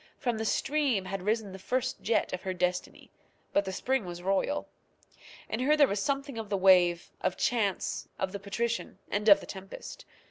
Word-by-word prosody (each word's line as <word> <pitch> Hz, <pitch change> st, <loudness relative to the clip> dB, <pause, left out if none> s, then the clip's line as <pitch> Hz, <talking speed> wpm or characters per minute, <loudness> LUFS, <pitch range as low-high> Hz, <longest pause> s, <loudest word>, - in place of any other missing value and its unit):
From 240 Hz, -3 st, -1 dB
the 220 Hz, -, -2 dB
stream 270 Hz, -5 st, +1 dB
had 195 Hz, 0 st, -4 dB
risen 210 Hz, +1 st, 0 dB
the 190 Hz, -, -9 dB
first 255 Hz, +6 st, -1 dB
jet 230 Hz, -, +1 dB
of 185 Hz, -, -3 dB
her 185 Hz, -1 st, -3 dB
destiny; 180 Hz, 0 st, -2 dB, 0.4 s
but 200 Hz, -, +3 dB
the 190 Hz, -, -3 dB
spring 260 Hz, +5 st, 0 dB
was 175 Hz, -1 st, -7 dB
royal. 195 Hz, +10 st, 0 dB, 0.8 s
In 220 Hz, -, -3 dB
her 295 Hz, +4 st, +3 dB
there 285 Hz, -2 st, +7 dB
was 200 Hz, -3 st, -1 dB
something 275 Hz, -1 st, -2 dB
of 220 Hz, -2 st, -6 dB
the 200 Hz, -, +1 dB
wave, 180 Hz, -2 st, +5 dB
of 180 Hz, -, 0 dB
chance, 210 Hz, -6 st, 0 dB
of 190 Hz, -, -2 dB
the 200 Hz, -, -5 dB
patrician, 230 Hz, +4 st, -2 dB
and 210 Hz, +2 st, +2 dB
of 200 Hz, -, +8 dB
the -, -, -9 dB
tempest. 195 Hz, 0 st, -9 dB
205 Hz, 190 wpm, -30 LUFS, 190-240 Hz, 0.8 s, of